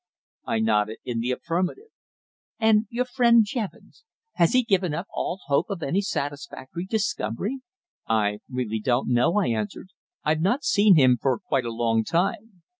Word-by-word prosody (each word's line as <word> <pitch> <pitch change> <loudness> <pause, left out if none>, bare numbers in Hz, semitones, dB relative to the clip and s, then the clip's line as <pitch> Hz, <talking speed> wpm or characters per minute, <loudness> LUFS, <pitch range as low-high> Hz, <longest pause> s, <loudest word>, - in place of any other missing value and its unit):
I - - -1
nodded 110 -1 +1
in 120 -2 -2
the 120 +2 -2
affirmative. 180 - -2 0.7
"And 220 -1 +3
your 245 +2 -1
friend 235 -3 +4
Jevons? 225 - -6 0.3
Has 170 -1 +2
he 255 0 +4
given 190 -8 +1
up 175 - -4
all 185 - -3
hope 140 -2 +1
of 190 -5 -4
any 180 +9 +1
satisfactory 145 -1 -5
discovery?" 205 - -2 0.5
"I 105 -2 +1
really 125 -4 -2
don't 120 +4 0
know," 125 +10 +2
I 205 - +2
answered. 110 - -3 0.3
"I've 155 +1 +1
not 240 - +1
seen 205 -2 +5
him 130 -5 +5
for 135 - +1
quite 135 - -1
a 115 - -3
long 115 -1 +1
time. 195 - -2
165 Hz, 160 wpm, -25 LUFS, -, 0.7 s, seen